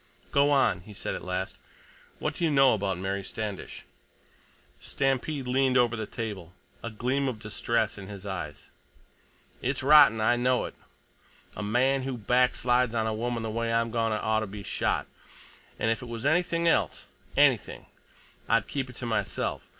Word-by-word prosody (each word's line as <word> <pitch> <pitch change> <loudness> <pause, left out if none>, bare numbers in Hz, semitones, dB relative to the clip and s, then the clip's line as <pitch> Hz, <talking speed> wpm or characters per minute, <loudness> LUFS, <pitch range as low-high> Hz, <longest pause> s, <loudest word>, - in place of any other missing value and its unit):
"Go 140 +1 +4
on," 135 -10 +3
he 105 +3 -13
said - - -4
at - - -6
last. 90 +1 -4 0.6
"What - - -2
do - - -5
you 165 - +3
know 135 -3 +5
about 100 -3 -1
Mary 95 +1 -3
Standish?" 105 0 -6 0.9
Stampede 135 +1 -1
leaned 130 0 +2
over 120 -1 +3
the 110 - -4
table, 100 -7 -6 0.3
a 115 - -4
gleam 130 +5 -1
of 125 -4 -2
distress 110 0 -1
in 95 - -9
his 100 -1 -9
eyes. 85 -7 -6 0.9
"It's 130 +1 -1
rotten. 140 -6 +7
I 115 +3 +3
know 125 +1 +2
it. - - -7 0.8
A - - -5
man 130 +6 +2
who 130 -1 -4
backslides 125 +1 +2
on 110 -1 +1
a 110 - -1
woman 115 +1 -2
the 110 - -3
way 115 +1 -1
I'm 115 0 +1
goin' 115 -1 +1
to 110 - -1
oughta 110 0 0
be 100 +1 -8
shot, - - -1 0.7
and 110 - +1
if 115 - -1
it 125 - -8
was 115 0 -6
anything 170 +2 +2
else—anything—I'd 115 -7 -1
keep 135 -2 -3
it 125 - -11
to 125 - -5
myself. 115 -1 -2
115 Hz, 165 wpm, -28 LUFS, 105-130 Hz, 0.9 s, rotten